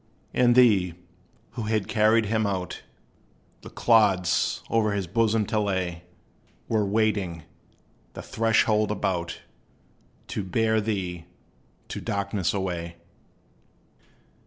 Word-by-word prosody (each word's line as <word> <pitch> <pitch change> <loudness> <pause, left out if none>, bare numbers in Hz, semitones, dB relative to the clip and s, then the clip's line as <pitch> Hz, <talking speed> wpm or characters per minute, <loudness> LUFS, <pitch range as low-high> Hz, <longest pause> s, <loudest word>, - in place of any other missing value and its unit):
And 120 -1 +4
they, 100 -9 +4 0.6
who 120 - -6
had 110 -2 -1
carried 110 0 +3
him 110 0 0
out, 95 -2 -4 0.8
The - - -10
clods 105 -6 +2
o'er 110 -2 +2
his 100 -2 -2
bosom 110 +3 +1
to 110 - -1
lay, 90 -4 -2 0.6
Were 110 -2 +1
waiting, 100 -5 0 0.7
the - - -8
threshold 110 -1 +2
about, 90 -4 -2 0.9
To 105 - -3
bear 110 +3 +1
thee 90 -5 -3 0.6
to - - -5
darkness 100 -2 -1
away. 85 -4 -3
105 Hz, 105 wpm, -25 LUFS, 90-110 Hz, 0.9 s, And